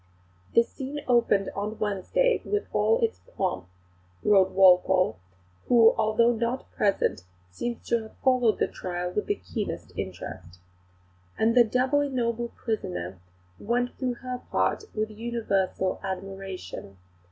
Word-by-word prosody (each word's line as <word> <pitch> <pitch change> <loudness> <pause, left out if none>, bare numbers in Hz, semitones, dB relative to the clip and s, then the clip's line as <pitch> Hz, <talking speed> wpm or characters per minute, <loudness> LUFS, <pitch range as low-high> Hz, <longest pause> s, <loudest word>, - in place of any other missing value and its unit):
"The 230 - +7
scene 275 +4 -6
opened 230 -5 +3
on 210 +2 -3
Wednesday 215 - +1
with 415 +1 -1
all 460 - +3
its 455 -1 0 0.2
pomp," 95 - -1 0.6
wrote 195 -2 +5
Walpole, 185 - +5 0.5
who 230 -2 +6
although 230 +2 +3
not 235 +3 -2
present 200 - +1 0.3
seems 235 - -4
to 235 -1 +2
have 220 - -12
followed 255 -4 +3
the - - +1
trial 180 -1 -4
with 210 - -2
the 410 - +1
keenest 195 - -5
interest, 90 -1 -7 0.8
"and 225 +1 +3
the 245 0 +7
doubly 260 +5 +1
noble 235 -2 -1
prisoner 90 - -4 0.4
went 245 +3 0
through 255 -2 -1
her 250 0 -3
part - - +1
with 215 0 -1
universal 210 -4 -1
admiration. 190 - -6
220 Hz, 130 wpm, -27 LUFS, 190-245 Hz, 0.8 s, The